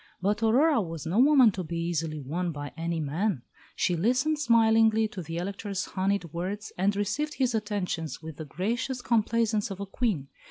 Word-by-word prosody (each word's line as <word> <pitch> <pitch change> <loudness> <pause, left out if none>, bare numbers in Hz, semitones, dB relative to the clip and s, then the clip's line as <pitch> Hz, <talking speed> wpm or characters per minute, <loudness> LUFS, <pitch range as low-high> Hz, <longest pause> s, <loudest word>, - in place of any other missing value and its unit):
But 205 +4 0
Aurora 255 +4 +4
was 165 -4 -6
no 175 +7 +1
woman 265 -4 +6
to 185 -1 -4
be 170 +1 -5
easily 165 -2 -2
won 170 +6 -2
by 145 -2 -6
any 165 0 -2
man. 155 - -1 0.3
She 180 - +1
listened 255 - +1
smilingly 225 -4 +4
to 195 - -6
the 165 0 -6
Elector's 195 +2 -3
honeyed 190 -4 -1
words, 195 +5 -4
and 195 +2 +1
received 210 +10 -1
his 255 -3 +1
attentions 200 - -2
with 160 -2 -9
the 155 - -6
gracious 235 - -2
complaisance 230 -2 +1
of 195 -1 -6
a 200 - -3
Queen. 195 - -1
200 Hz, 175 wpm, -28 LUFS, 170-225 Hz, 0.3 s, woman